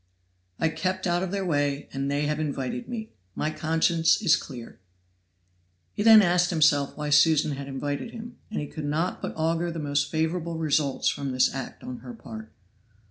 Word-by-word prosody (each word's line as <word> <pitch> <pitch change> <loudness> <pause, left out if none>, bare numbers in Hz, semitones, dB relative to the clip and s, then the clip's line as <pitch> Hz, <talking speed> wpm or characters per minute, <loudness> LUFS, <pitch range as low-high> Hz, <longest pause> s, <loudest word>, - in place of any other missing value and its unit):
"I 160 - +2
kept 185 +3 -2
out 175 0 +1
of 190 - -2
their 195 0 -2
way, 145 -4 0
and 135 +1 -2
they 145 +1 0
have 150 +1 -1
invited 135 -5 -3
me; 220 -2 -5 0.2
my 155 - -1
conscience 165 +1 +2
is 170 -7 +4
clear." 125 -6 -8 1.1
He - - -3
then 220 -1 +8
asked 175 0 +3
himself 150 -4 +2
why 150 -1 -3
Susan 150 0 +5
had 140 0 -5
invited 145 - -3
him; 235 +1 -9
and 215 - -3
he 150 - -3
could 150 +1 -7
not 160 +5 -1
but - - -4
augur 165 +2 0
the 165 - -5
most 145 -2 0
favorable 165 +1 -1
results 150 -3 0
from 140 -1 -1
this 130 0 +3
act 135 -2 -7
on 125 -1 -6
her 120 -1 -9
part. 110 -1 -10
155 Hz, 185 wpm, -26 LUFS, 140-175 Hz, 1.1 s, then